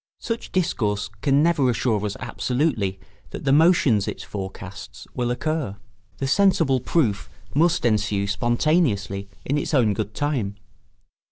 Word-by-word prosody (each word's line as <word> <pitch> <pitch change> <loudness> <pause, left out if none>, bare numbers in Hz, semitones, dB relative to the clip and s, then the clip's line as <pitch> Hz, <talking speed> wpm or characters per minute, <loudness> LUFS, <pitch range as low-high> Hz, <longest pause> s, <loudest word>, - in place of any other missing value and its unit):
Such 230 0 -5
discourse 105 - 0
can 140 0 +3
never 155 -6 +3
assure 115 -3 0
us 100 - -5
absolutely 125 -8 -1 0.3
that - - -7
the 135 - +2
motions 145 - +4
it - - -5
forecasts 95 -1 -8
will 120 -1 -1
occur; 135 -4 -2 0.4
the 135 - -2
sensible 160 -4 +3
proof 120 -6 0 0.2
must 165 0 +2
ensue 105 -3 +1
spontaneously 105 - 0 0.2
in 145 +2 +1
its 150 - -2
own 115 -6 +3
good 105 0 -4
time. 130 -9 -1
125 Hz, 135 wpm, -23 LUFS, 105-150 Hz, 0.4 s, motions